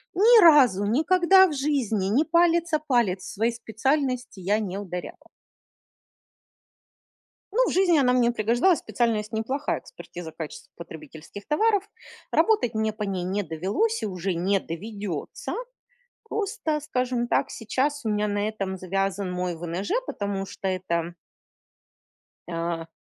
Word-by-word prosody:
ни 450 Hz, +4 st, +7 dB
разу 270 Hz, -, +6 dB
никогда 365 Hz, -, +5 dB
в 310 Hz, -, -4 dB
жизни 265 Hz, -9 st, 0 dB
ни 245 Hz, +9 st, +3 dB
палец 335 Hz, 0 st, +2 dB
о 310 Hz, -, +4 dB
палец 240 Hz, -11 st, +1 dB
в -, -, -7 dB
своей 225 Hz, +4 st, +1 dB
специальности 250 Hz, 0 st, -2 dB
я 205 Hz, +4 st, +1 dB
не 195 Hz, -3 st, -4 dB
ударяла. 180 Hz, -3 st, -7 dB, 2.3 s
Ну, -, -, +3 dB
в -, -, -1 dB
жизни 360 Hz, -4 st, +4 dB
она 250 Hz, -3 st, +3 dB
мне 245 Hz, -1 st, +3 dB
пригождалась, 240 Hz, -, +2 dB
специальность 220 Hz, -3 st, -1 dB
неплохая- 260 Hz, +6 st, -2 dB
экспертиза 175 Hz, -, -10 dB
качества 155 Hz, -2 st, -8 dB
потребительских 160 Hz, +3 st, -11 dB
товаров. 410 Hz, +6 st, +2 dB, 0.5 s
Работать 330 Hz, -, +2 dB
мне 220 Hz, 0 st, 0 dB
по 215 Hz, -, -7 dB
ней 190 Hz, -3 st, -2 dB
не 195 Hz, +3 st, -1 dB
довелось 200 Hz, -, -1 dB
и -, -, -1 dB
уже 185 Hz, -1 st, -3 dB
не 190 Hz, +3 st, +1 dB
доведётся. 200 Hz, -1 st, -6 dB, 0.7 s
Просто, 400 Hz, -8 st, -2 dB
скажем 250 Hz, -4 st, -1 dB
так, -, -, +1 dB
сейчас 265 Hz, +5 st, -2 dB
у -, -, 0 dB
меня 210 Hz, 0 st, 0 dB
на 205 Hz, 0 st, -1 dB
этом 195 Hz, -3 st, -4 dB
завязан 195 Hz, +1 st, -2 dB
мой 180 Hz, -1 st, -2 dB
ВНЖ, 170 Hz, +3 st, -5 dB, 0.2 s
потому 200 Hz, -, -3 dB
что 195 Hz, -, -6 dB
это 175 Hz, -2 st, -2 dB, 1.3 s
а 165 Hz, -1 st, -3 dB
220 Hz, 135 wpm, -25 LUFS, 190-295 Hz, 2.3 s, ни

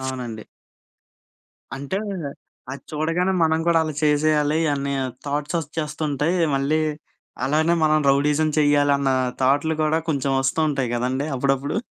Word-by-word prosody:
అవునండి. 125 Hz, -4 st, -5 dB, 1.3 s
అంటే 140 Hz, +8 st, -3 dB, 0.7 s
అది 140 Hz, -, -8 dB
చూడగానే 165 Hz, +5 st, 0 dB
మనం 160 Hz, 0 st, +2 dB
గూడా 170 Hz, -1 st, +4 dB
అలా 155 Hz, -1 st, -4 dB
చేసేయాలి 150 Hz, 0 st, +2 dB, 0.2 s
అని 140 Hz, 0 st, -2 dB, 0.3 s
థాట్స్ 145 Hz, +4 st, -2 dB
ఒస్‌చ్చేస్తుంటయి. 150 Hz, +1 st, -2 dB, 0.2 s
మళ్ళీ 145 Hz, +3 st, +1 dB, 0.6 s
అలానే 155 Hz, +5 st, +2 dB
మనం 155 Hz, 0 st, +4 dB
రౌడీయిజం 145 Hz, +3 st, +2 dB
చెయ్యాలన్న 145 Hz, -2 st, +3 dB, 0.3 s
థాట్‌లు 145 Hz, +4 st, +2 dB
కూడా 155 Hz, +1 st, +2 dB
కొంచెం 140 Hz, -2 st, -1 dB
వస్తూ 135 Hz, +4 st, 0 dB
ఉంటాయి 135 Hz, -4 st, -1 dB
గదండీ! 130 Hz, +4 st, -1 dB
అప్పుడప్పుడు. 135 Hz, +3 st, 0 dB
145 Hz, 115 wpm, -22 LUFS, 135-155 Hz, 1.3 s, గూడా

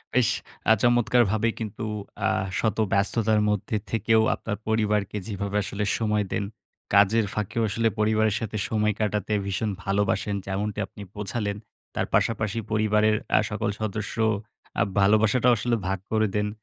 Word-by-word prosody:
বেশ 125 Hz, -3 st, +4 dB, 0.4 s
আ -, -, +9 dB
চমৎকারভাবে 120 Hz, -2 st, +3 dB
কিন্তু, 110 Hz, 0 st, -5 dB, 0.4 s
আ -, -, +3 dB, 0.3 s
শত 110 Hz, -2 st, 0 dB, 0.2 s
ব্যস্ততার 105 Hz, +2 st, +2 dB
মধ্যে 105 Hz, +1 st, -1 dB, 0.2 s
থেকেও 110 Hz, 0 st, +3 dB
আপনার 105 Hz, -2 st, -4 dB
পরিবারকে 105 Hz, -2 st, +1 dB
যেভাবে 100 Hz, -1 st, -2 dB
আসলে 105 Hz, +1 st, -3 dB
সময় 105 Hz, -2 st, +1 dB
দেন, 105 Hz, -, 0 dB, 0.5 s
কাজের 105 Hz, +2 st, +5 dB
ফাঁকেও 105 Hz, +2 st, -2 dB
আসলে 115 Hz, +3 st, +1 dB
পরিবারের 110 Hz, -1 st, +2 dB
সাথে 110 Hz, -1 st, -4 dB
সময় 105 Hz, -1 st, +1 dB
কাটাতে 105 Hz, 0 st, -1 dB
ভীষণ 100 Hz, +3 st, -1 dB
ভালোবাসেন, 100 Hz, +1 st, 0 dB
যেমনটি 100 Hz, +2 st, -2 dB
আপনি -, -, -13 dB
বোঝালেন। 105 Hz, 0 st, -2 dB, 0.4 s
তার -, -, 0 dB
পাশাপাশি 110 Hz, -1 st, +1 dB
পরিবারের 110 Hz, 0 st, +3 dB, 0.2 s
আ -, -, +6 dB
সকল -, -, -1 dB
সদস্য 105 Hz, -1 st, -3 dB, 0.6 s
আ -, -, +4 dB, 0.2 s
ভালোবাসাটাও 110 Hz, +5 st, +4 dB
আসলে 120 Hz, +3 st, 0 dB
ভাগ 95 Hz, 0 st, -1 dB
করে 110 Hz, -1 st, +3 dB
দেন। 105 Hz, 0 st, +1 dB
105 Hz, 140 wpm, -25 LUFS, 105-110 Hz, 0.6 s, আ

